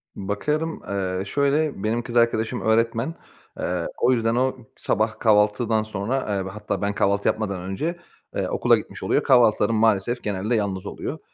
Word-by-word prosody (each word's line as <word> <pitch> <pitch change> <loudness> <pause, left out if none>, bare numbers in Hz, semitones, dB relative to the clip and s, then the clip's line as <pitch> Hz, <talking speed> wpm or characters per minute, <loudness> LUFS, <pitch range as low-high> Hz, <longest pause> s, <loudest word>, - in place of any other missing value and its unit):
Bakarım. 150 +12 -2
Eee, 95 -1 -2
şöyle 140 +1 0
benim 115 +2 0
kız 120 0 -7
arkadaşım 115 -1 +2
öğretmen. 115 +6 +1 0.4
Eee, 90 -1 -1
o - - +3
yüzden 115 -2 +1
o, 130 +1 +1 0.2
sabah 110 +2 -1
kahvaltıdan 110 +1 +3
sonra, 110 +5 -2
eee, 95 -1 -2
ve 95 - -5
hatta 105 -1 -4
ben 100 0 -1
kahvaltı 100 0 +1
yapmadan 100 -4 -1
önce, 150 - -3 0.4
eee, - - -1
okula - - +3
gitmiş - - -8
oluyor. - - +1
Kahvaltılarım 115 -3 +4
maalesef 110 +2 +2
genelde 105 +3 -1
yalnız 100 -4 -2
oluyor. - - -5
110 Hz, 160 wpm, -23 LUFS, 100-120 Hz, 0.4 s, Kahvaltılarım